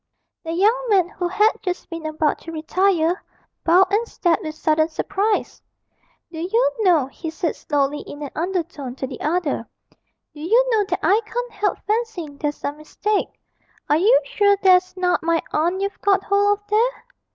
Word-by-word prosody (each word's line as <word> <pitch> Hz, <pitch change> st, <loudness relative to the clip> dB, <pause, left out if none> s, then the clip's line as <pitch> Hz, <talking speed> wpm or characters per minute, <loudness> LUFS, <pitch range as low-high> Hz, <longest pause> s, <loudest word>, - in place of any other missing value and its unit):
The 325 Hz, -, -4 dB
young 435 Hz, +8 st, +2 dB
man, 375 Hz, -4 st, +3 dB
who 360 Hz, -2 st, -3 dB
had 420 Hz, +4 st, +3 dB
just 365 Hz, -1 st, -4 dB
been 330 Hz, -1 st, -5 dB
about 310 Hz, -1 st, 0 dB
to 330 Hz, -, -9 dB
retire, 340 Hz, +2 st, +1 dB, 0.4 s
bowed 370 Hz, +4 st, +4 dB
and 455 Hz, +3 st, +2 dB
stared 345 Hz, -6 st, +1 dB
with 310 Hz, -1 st, -6 dB
sudden 315 Hz, 0 st, +1 dB
surprise. 405 Hz, +5 st, -1 dB, 0.7 s
'Do 320 Hz, -, -7 dB
you 455 Hz, +9 st, +1 dB
know,' 350 Hz, -10 st, +4 dB
he 315 Hz, +5 st, -7 dB
said 325 Hz, +1 st, -2 dB
slowly 290 Hz, -1 st, -1 dB
in 290 Hz, +1 st, -9 dB
an 285 Hz, -, -6 dB
undertone 330 Hz, -7 st, -3 dB
to 265 Hz, -, -4 dB
the -, -, -8 dB
other, 305 Hz, -7 st, -1 dB, 0.7 s
'do 295 Hz, -, -11 dB
you 455 Hz, +10 st, +3 dB
know 430 Hz, -3 st, +2 dB
that -, -, -3 dB
I 415 Hz, +4 st, +4 dB
can't 485 Hz, +2 st, -4 dB
help 410 Hz, -, -1 dB
fancying 415 Hz, -10 st, -2 dB
there's 295 Hz, -1 st, -2 dB
some 290 Hz, +1 st, -4 dB
mistake 405 Hz, +7 st, -1 dB, 0.6 s
are 300 Hz, -, +5 dB
you 440 Hz, +9 st, +5 dB
sure 410 Hz, -5 st, +3 dB
that's 370 Hz, 0 st, +4 dB
not 360 Hz, -1 st, +1 dB
my 330 Hz, 0 st, +1 dB
aunt 345 Hz, +5 st, +1 dB
you've 395 Hz, 0 st, -3 dB
got 390 Hz, -1 st, +2 dB
hold 405 Hz, +1 st, +2 dB
of 410 Hz, -, -37 dB
there?' 460 Hz, +4 st, +1 dB
360 Hz, 175 wpm, -21 LUFS, 315-410 Hz, 0.7 s, are